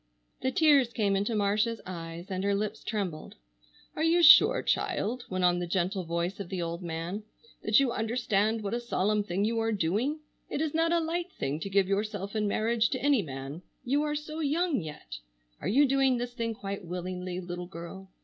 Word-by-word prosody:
The 260 - +1
tears 280 -3 +4
came 200 -3 +1
into 205 +4 0
Marcia's 210 +2 +1
eyes 170 +1 -7
and 185 0 -2
her 200 0 +2
lips 210 +1 -3
trembled. 190 -8 -4 0.6
"Are - - -3
you 340 +2 +4
sure, 375 +9 +8
child," 240 +3 -1
went 185 -1 -1
on 175 0 +4
the 175 - -3
gentle 185 +1 -1
voice 170 +3 -2
of 195 -3 -6
the 190 - -3
old 170 +1 -3
man, 170 +4 -4 0.4
"that 215 +3 +4
you 270 -3 +2
understand 220 -2 0
what 200 - -3
a 240 - 0
solemn 210 -3 0
thing 195 +1 -1
you 230 +1 0
are 225 0 0
doing? 215 - 0 0.3
It - - -2
is 310 -1 -1
not 330 +1 +2
a 340 - +4
light 340 +2 -2
thing 145 - -3
to 195 - -4
give 195 -1 +3
yourself 200 0 -2
in 210 -1 +1
marriage 225 +2 +1
to 260 - -2
any 285 -5 +4
man. 135 0 -7 0.2
You 280 +4 +2
are 300 0 -1
so 305 +1 -5
young 315 - +1
yet! 105 - -8 0.4
Are - - -3
you 270 +9 +5
doing 270 -1 +3
this 245 0 -4
thing 230 -2 -3
quite 200 -1 -5
willingly, 180 +1 -4
little 175 0 -6
girl? 185 +2 -9
205 Hz, 200 wpm, -29 LUFS, 180-250 Hz, 0.6 s, sure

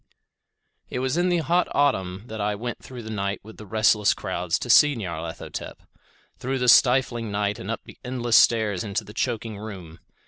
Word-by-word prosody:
It - - -4
was 130 +2 -1
in 175 +1 +2
the 175 - +2
hot 175 +4 +2
autumn 95 -10 +1
that 110 -3 -6
I 105 0 0
went 120 +3 -5
through 125 -2 -10
the 110 - -7
night 100 -1 -2
with 110 +2 -13
the 105 - -11
restless 105 0 +3
crowds 90 -2 -2
to - - -6
see 145 +4 +6
Nyarlathotep; 85 -6 -6 0.6
through 135 +2 -2
the 125 -1 +2
stifling 125 -3 +4
night 100 0 -1
and 95 - -7
up 115 - -3
the - - -15
endless 120 -2 0
stairs 105 -6 +4
into 105 -1 -2
the 105 - -12
choking 115 -3 -3
room. 95 -6 -9
110 Hz, 185 wpm, -24 LUFS, 100-125 Hz, 0.6 s, see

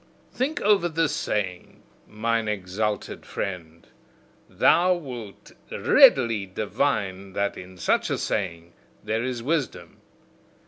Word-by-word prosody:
Think 275 +5 -1
over 200 -4 +3
this 160 -2 0
saying, 95 -4 -3 0.2
mine 115 +1 -1
exalted 105 +1 -3
friend: 85 -4 -6 0.6
thou 180 +1 +4
wilt 125 - -9 0.2
readily 115 -6 +5
divine 100 -2 -2
that 100 0 -1
in 90 0 -11
such - - +1
a - - 0
saying 85 -4 -3 0.3
there 110 +1 -1
is 125 -2 -3
wisdom. 135 - -2
105 Hz, 105 wpm, -25 LUFS, 95-135 Hz, 0.6 s, readily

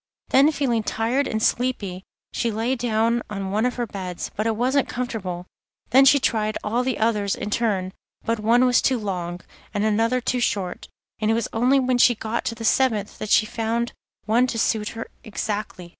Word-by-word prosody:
Then 280 +4 +5
feeling 255 -7 0
tired 235 +6 0
and 220 0 -2
sleepy 200 -7 -1 0.3
she 235 - 0
lay 225 +4 -1
down 235 -1 +1
on 195 -2 -4
one 215 +4 +2
of 250 - -3
the 240 - -1
beds, 185 -5 -6
but 215 +2 -1
it 225 - +1
wasn't 260 +4 +1
comfortable; 200 -8 -4 0.5
then 265 +3 +7
she 285 +1 +6
tried 215 -4 0
all 230 +4 0
the 255 -1 -1
others 210 -3 +1
in 210 - -5
turn, 195 -5 0 0.3
but 230 -1 0
one 235 +4 +4
was 250 -1 +4
too 260 - +2
long, 180 -4 -4 0.3
and 205 +1 +1
another 225 +4 +2
too 250 +1 -1
short, 195 -6 -2 0.3
and 215 0 0
it 225 - +3
was 230 - -1
only 250 +4 +3
when 255 -1 +1
she 240 0 +6
got 220 +2 -3
to 230 - -2
the 225 0 -6
seventh 220 -4 +1
that 215 - -5
she 215 - +5
found 230 +2 -2 0.3
one 235 +4 +3
to 240 - -3
suit 220 -2 0
her 225 - -4 0.2
exactly. 210 -4 -4
225 Hz, 195 wpm, -23 LUFS, 210-245 Hz, 0.5 s, then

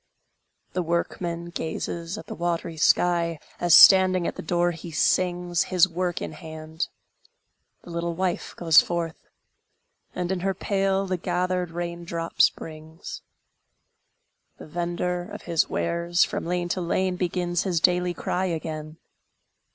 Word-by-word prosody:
The 180 - 0
workman 170 0 -2
gazes 165 +1 -4
at - - -8
the - - -7
watery 170 0 -2
sky, 170 +1 +2 0.2
As 175 -2 +5
standing 185 -2 +8
at - - -1
the - - -6
door 175 +1 +1
he 170 0 -8
sings, 175 +2 +1
His 185 -1 +4
work 175 0 -2
in - - -5
hand; 160 0 -6 1.0
the 175 - -11
little 170 0 -2
wife 185 0 -2
goes 165 -3 +6
forth, 170 -2 -4 0.9
And 180 0 -2
in 190 - -1
her 190 +1 -1
pail 195 0 0
the 185 -1 -1
gathered 180 0 -1
rain 170 0 -5
drops 170 0 +2
brings; 160 +1 -9 1.4
The - - -10
vendor 175 +2 -3
of - - -8
his 170 -2 +1
wares, 170 +1 +1
from - - -3
lane 175 0 -1
to 185 - -1
lane, 185 +2 0
Begins 175 -1 -1
his 180 -4 0
daily 180 +1 +2
cry 185 +3 -1
again. 155 -2 -4
175 Hz, 140 wpm, -25 LUFS, 165-180 Hz, 1.4 s, standing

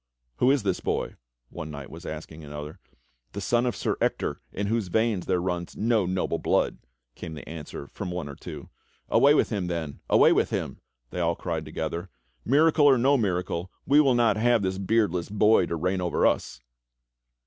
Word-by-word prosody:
"Who 125 - +3
is 135 -4 +3
this 95 -3 0
boy.?" - - -2 0.4
one 80 - -6
knight 70 -2 -8
was 85 +2 -9
asking 80 +1 -7
another. 75 +1 -8 0.5
"The - - -4
son 120 +5 +1
of 120 - -1
Sir - - -1
Ector - - -1
iii 100 - -3
whose 110 -1 0
veins 110 -1 0
there 90 -1 +2
runs 90 -1 -3
no 110 -3 +2
noble 95 0 -1
blood," - - +1 0.3
came 80 +3 -8
the 75 - -10
answer 75 -3 -7
from 90 +6 -6
one 90 -4 -4
or 70 - -7
two. - - -9 0.4
"Away 145 +2 +5
with - - +2
him, 100 -5 -1
then, 80 -4 -4
away - - +6
with - - +2
him!" - - -3 0.3
they - - -4
all 85 -1 +1
cried 80 -3 -4
together. 80 +4 -4 0.3
"Miracle 150 +3 +4
or 135 -2 +6
no 135 +4 +4
miracle, 90 -5 -1 0.2
we 145 +2 +6
will 135 -4 +3
not 120 -2 +3
have 120 -1 +3
this 95 0 -1
beardless 95 -4 +1
boy 105 -2 +4
to 85 - -2
reign 90 +3 -1
over 90 -1 +1
us!" - - 0
95 Hz, 190 wpm, -26 LUFS, 85-115 Hz, 0.5 s, away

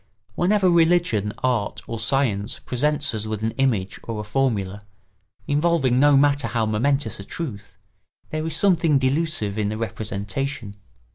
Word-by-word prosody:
Whenever 190 - +2
religion, 165 - +3
art, 110 -5 -1
or 115 - -5
science 110 -4 0
presents 145 +3 0
us 110 0 -4
with 110 0 -4
an 110 - 0
image 110 -8 0
or 115 -2 -5
a - - -3
formula, 105 -4 -1 0.6
involving 145 -4 +2
no 145 0 +6
matter 140 -3 +3
how 115 0 0
momentous 115 +2 0
a - - -6
truth, 105 - -7 0.5
there 155 0 -2
is 160 - -1
something 170 -6 +3
delusive 130 -6 0
in 105 -1 0
the 110 - -3
representation. 110 +2 -4
125 Hz, 145 wpm, -23 LUFS, 105-145 Hz, 0.6 s, no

